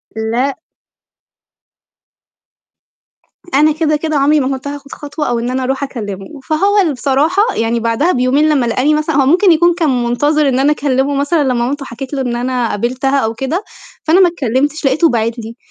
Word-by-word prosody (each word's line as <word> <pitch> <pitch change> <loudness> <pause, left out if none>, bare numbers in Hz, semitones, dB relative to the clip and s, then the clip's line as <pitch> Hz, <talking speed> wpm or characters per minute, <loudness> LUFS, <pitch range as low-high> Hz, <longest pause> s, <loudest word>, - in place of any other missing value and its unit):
لأ. 235 +5 -1 3.0
أنا 305 +3 +4
كده، 305 0 0
كده 310 0 -2
عمري 295 +2 +3
ما 260 - 0
كنت 275 - -9
هاخد 285 -1 -8
خطوة، 295 +1 -5
أو 235 -1 0
إن 240 +1 -3
أنا 260 0 -2
أروح 265 +2 -2
أكلِّمه، 215 0 -6
فهو 395 +6 +2
اللي 320 -6 0
بصراحة 290 +10 +1
يعني 230 +1 0
بعدها 230 +10 +1
بيومين 265 +5 +2
لمّا 275 -5 +2
لقاني 255 +6 +1
مثلًا 305 0 -1
هو 275 -2 +3
ممكن 355 +6 +4
يكون 345 +2 +4
كان 280 -8 0
منتظر 290 +5 +1
إن 260 0 0
أنا 285 +2 +3
أكلِّمه 280 -1 0
مثلًا، 285 +2 +1
لمّا 260 -2 0
مامته 265 +4 -2
حكت 260 +4 -8
له 270 - -1
إن 245 -2 -2
أنا 245 -1 -1
قابِلتها 255 +6 -1
أو 225 -2 -1
كده، 270 - -3 0.4
فأنا 330 +4 +3
ما 370 - +6
اتكلِّمتش، 285 0 -1
لقيته 310 +5 +3
باعت 230 0 -1
لي 230 +1 -8
275 Hz, 180 wpm, -15 LUFS, 245-305 Hz, 3.0 s, ما